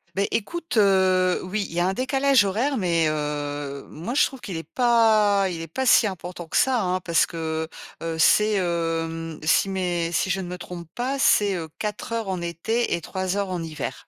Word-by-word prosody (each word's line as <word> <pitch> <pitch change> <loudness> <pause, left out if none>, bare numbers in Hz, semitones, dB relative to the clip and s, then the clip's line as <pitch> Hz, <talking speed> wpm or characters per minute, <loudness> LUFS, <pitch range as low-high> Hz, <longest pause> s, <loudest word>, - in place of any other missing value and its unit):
Beh, 200 +1 +1
écoute, 330 +6 -3
heu, 185 -3 +3
oui, 200 +2 -2
il - - -10
y - - +1
a 175 - +2
un 190 - 0
décalage 265 +1 +3
horaire 240 +9 0
mais 170 -5 +1
heu, 145 -2 -4
moi, 170 +10 -6
je 295 - +5
trouve 265 - -7
qu'il 185 -7 -5
est 165 - -5
pas 220 -5 +3
il 170 -2 -5
est 165 - -6
pas 260 - -3
si 235 -2 +6
important 180 -2 -7
que - - -1
ça, 255 -2 +3
hein, 185 -1 0
parce 170 -2 +2
que, 160 -1 -3 0.3
heu, 165 -1 -3
c'est, 210 +6 +4
hem, 165 -3 -2
si, 165 +5 +3
mais 175 -3 -1
si 175 +3 0
je 190 +1 -1
ne 180 - -6
me 180 +1 -6
trompe 175 -1 -8
pas, 260 +3 -2
c'est, 205 -6 +4
heu, 165 -3 -4
4 210 +2 -4
heures 225 -3 -2
en 185 -2 -2
été 175 +8 -1
et 170 - -5
3 185 +3 -3
heures 200 -1 -1
en 180 -2 -3
hiver. 160 -2 -6
185 Hz, 215 wpm, -24 LUFS, 165-215 Hz, 0.3 s, si